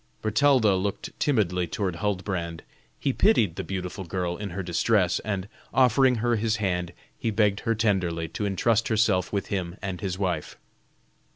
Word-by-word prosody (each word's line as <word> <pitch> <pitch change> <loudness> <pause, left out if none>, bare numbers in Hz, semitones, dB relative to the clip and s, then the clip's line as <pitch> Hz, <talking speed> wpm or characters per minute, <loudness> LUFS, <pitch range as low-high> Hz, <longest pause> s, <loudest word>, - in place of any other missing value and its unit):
Bertalda 110 -1 +4
looked 100 +1 -3
timidly 90 - +1
toward 95 -3 -2
Huldbrand. 90 -4 -2 0.4
He 135 - 0
pitied 110 - +3
the - - -4
beautiful 95 0 -4
girl 90 0 -2
in 100 +1 -5
her 95 +2 -4
distress, 90 +1 +2
and 100 -3 -3 0.3
offering 130 0 +5
her 120 +1 +1
his 110 +1 +1
hand 90 -5 -1 0.3
he 115 - -1
begged 105 -2 +2
her 115 - 0
tenderly 90 -7 0
to 105 +5 -3
intrust 110 +4 +1
herself 105 -5 +2
with 100 -2 -2
him 90 -2 -3
and 95 -2 -5
his 95 -2 -2
wife. 90 -5 -2
100 Hz, 160 wpm, -26 LUFS, 90-110 Hz, 0.4 s, offering